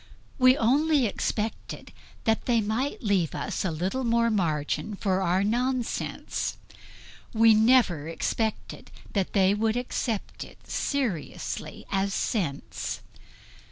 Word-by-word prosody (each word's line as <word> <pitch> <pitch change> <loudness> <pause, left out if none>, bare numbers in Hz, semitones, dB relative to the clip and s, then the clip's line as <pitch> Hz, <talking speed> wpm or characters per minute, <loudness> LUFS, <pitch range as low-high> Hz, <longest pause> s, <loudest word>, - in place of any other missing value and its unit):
We 255 +1 +6
only 285 +4 +3
expected 215 +1 -3 0.3
that 225 0 +1
they 240 -2 +4
might 225 +7 -2
leave 195 -7 +1
us - - -3
a 190 - 0
little 185 +11 -2
more 235 -1 +2
margin 170 +1 -1
for 195 -1 0
our 185 +1 +2
nonsense; 245 +3 -1 0.8
we 225 0 +6
never 215 - +4
expected 220 +6 -3 0.2
that 195 -3 -1
they 195 -1 +4
would 220 +2 +1
accept 240 -3 -3
it - - -16
seriously 240 - -3
as 195 0 0
sense. 165 - -2
220 Hz, 115 wpm, -27 LUFS, 190-240 Hz, 0.8 s, We